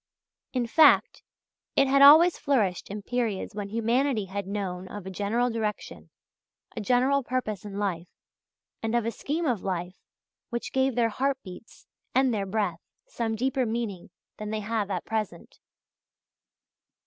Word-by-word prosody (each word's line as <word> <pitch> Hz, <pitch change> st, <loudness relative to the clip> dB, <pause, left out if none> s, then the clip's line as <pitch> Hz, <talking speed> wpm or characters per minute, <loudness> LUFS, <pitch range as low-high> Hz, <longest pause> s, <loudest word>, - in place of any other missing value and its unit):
In 250 Hz, -2 st, 0 dB
fact, 300 Hz, +5 st, +5 dB, 0.5 s
it 275 Hz, -, +4 dB
had 275 Hz, +1 st, +4 dB
always 315 Hz, +5 st, +9 dB
flourished 215 Hz, -, 0 dB
in 205 Hz, +1 st, -6 dB
periods 230 Hz, -4 st, -2 dB
when 200 Hz, -1 st, -5 dB
humanity 230 Hz, +1 st, +1 dB
had 195 Hz, 0 st, -5 dB
known 190 Hz, -2 st, -4 dB
of 205 Hz, 0 st, -8 dB
a 190 Hz, -, -6 dB
general 225 Hz, +6 st, 0 dB
direction, 220 Hz, -2 st, -4 dB, 0.7 s
a 225 Hz, -, -3 dB
general 255 Hz, +6 st, +2 dB
purpose 235 Hz, -6 st, -3 dB
in 200 Hz, -1 st, -7 dB
life, 185 Hz, -4 st, -2 dB, 0.7 s
and 225 Hz, +1 st, -1 dB
of 235 Hz, -2 st, +1 dB
a 230 Hz, -, 0 dB
scheme 305 Hz, +9 st, -3 dB
of 240 Hz, -9 st, 0 dB
life 180 Hz, -1 st, -4 dB, 0.5 s
which 235 Hz, -1 st, -4 dB
gave 265 Hz, -1 st, +1 dB
their 235 Hz, -2 st, +2 dB
heart 270 Hz, +5 st, 0 dB
beats 185 Hz, +3 st, -12 dB, 0.3 s
and 260 Hz, -1 st, +3 dB
their 200 Hz, -2 st, -2 dB
breath 190 Hz, -4 st, -1 dB, 0.2 s
some 225 Hz, -2 st, -3 dB
deeper 260 Hz, +3 st, 0 dB
meaning 220 Hz, -5 st, -4 dB, 0.3 s
than 210 Hz, 0 st, -5 dB
they 215 Hz, 0 st, -2 dB
have 210 Hz, -1 st, -2 dB
at 185 Hz, -3 st, -3 dB
present. 215 Hz, -6 st, -4 dB
220 Hz, 150 wpm, -27 LUFS, 200-255 Hz, 0.7 s, always